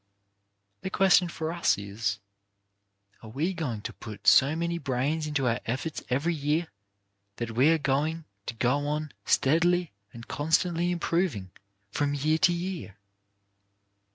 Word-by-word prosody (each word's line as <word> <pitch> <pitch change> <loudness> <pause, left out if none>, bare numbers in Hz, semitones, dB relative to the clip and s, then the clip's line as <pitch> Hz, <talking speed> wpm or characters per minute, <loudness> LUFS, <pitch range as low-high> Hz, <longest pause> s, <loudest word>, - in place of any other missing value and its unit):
The - - -3
question 190 -2 +4
for 160 -1 -4
us 170 - +2
is: 100 0 -3 1.0
"Are 110 - -10
we 155 +11 -1
going 135 - -3
to - - -5
put 110 -2 -10
so 140 +4 +6
much 170 +1 -2
brains 140 +5 -1
into 145 -3 -1
our 115 +1 +1
efforts 135 +6 -3
every 145 +7 +1
year, 150 +2 -1 0.7
that 115 +1 -4
we 130 +7 +4
are 165 - +4
going 150 +3 -1 0.2
to - - -4
go 130 +5 +1
on 150 0 -2
steadily 170 +4 +2 0.2
and 115 0 -11
constantly 170 +3 +1
improving 170 - -1 0.4
from 145 +5 0
year 155 +3 +1
to 175 - +5
year 175 - -4
150 Hz, 140 wpm, -28 LUFS, 125-170 Hz, 1.0 s, so